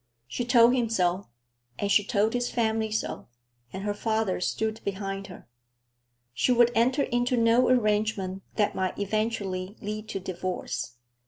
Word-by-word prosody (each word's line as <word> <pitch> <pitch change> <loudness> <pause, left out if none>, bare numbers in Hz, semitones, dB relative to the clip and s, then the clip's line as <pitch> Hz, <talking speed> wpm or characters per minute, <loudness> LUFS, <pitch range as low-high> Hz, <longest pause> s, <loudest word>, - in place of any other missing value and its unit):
She 235 - -3
told 240 0 +6
him 240 -3 +1
so, 185 -3 0 0.5
and 200 - -1
she 205 - +5
told 210 +2 +1
his 245 0 0
family 220 -2 0
so, 215 0 -3 0.4
and 190 - -6
her 205 0 -1
father 220 -3 -1
stood 220 +4 -1
behind 195 0 -4
her. 180 - -12 0.9
She 185 - +1
would 240 -1 +5
enter 255 +5 +2
into 245 +1 0
no 230 +2 +4
arrangement 210 -5 +1
that 210 -2 +1
might 185 -1 -2
eventually 200 -2 -2
lead 215 +1 -5
to 195 - -3
divorce. 185 -8 -4
215 Hz, 150 wpm, -27 LUFS, 195-230 Hz, 0.9 s, told